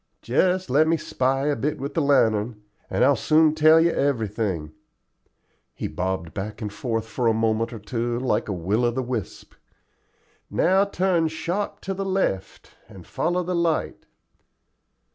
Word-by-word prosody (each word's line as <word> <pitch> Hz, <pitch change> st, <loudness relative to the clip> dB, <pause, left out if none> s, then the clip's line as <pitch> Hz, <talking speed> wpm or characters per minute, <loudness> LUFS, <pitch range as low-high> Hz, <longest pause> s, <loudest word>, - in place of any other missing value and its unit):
"Just 180 Hz, +10 st, +1 dB
let 155 Hz, +4 st, +4 dB
me 165 Hz, +1 st, +2 dB
spy 135 Hz, -1 st, -1 dB
a 145 Hz, -1 st, +1 dB
bit 145 Hz, +5 st, -2 dB
with 140 Hz, +2 st, -5 dB
the 165 Hz, -, +1 dB
lantern, 110 Hz, -6 st, +2 dB, 0.3 s
and 125 Hz, -, +2 dB
I'll 140 Hz, +1 st, +5 dB
soon 155 Hz, +1 st, +3 dB
tell 155 Hz, +1 st, +6 dB
you 170 Hz, +1 st, +3 dB
everything." 105 Hz, -, -1 dB, 1.0 s
He -, -, -3 dB
bobbed 90 Hz, -3 st, -3 dB
back 105 Hz, +3 st, -5 dB
and 105 Hz, -3 st, -5 dB
forth 115 Hz, 0 st, -2 dB
for 120 Hz, +2 st, -2 dB
a 115 Hz, -, +3 dB
moment 115 Hz, +1 st, 0 dB
or 115 Hz, -, -6 dB
two 120 Hz, +2 st, -3 dB
like 120 Hz, -4 st, -1 dB
a -, -, -1 dB
will 100 Hz, +6 st, -1 dB
o' 120 Hz, -, +3 dB
the 130 Hz, +2 st, -2 dB
wisp. 120 Hz, -5 st, -5 dB, 1.0 s
"Now 190 Hz, +3 st, +3 dB
turn 185 Hz, -4 st, +1 dB
sharp 175 Hz, +5 st, -3 dB
to 195 Hz, -, -3 dB
the 195 Hz, +1 st, -3 dB
left, 190 Hz, -, -2 dB, 0.2 s
and 95 Hz, -5 st, -13 dB
follow 180 Hz, +1 st, -1 dB
the 180 Hz, +1 st, -3 dB
light." 170 Hz, -2 st, -1 dB
130 Hz, 160 wpm, -24 LUFS, 110-160 Hz, 1.0 s, tell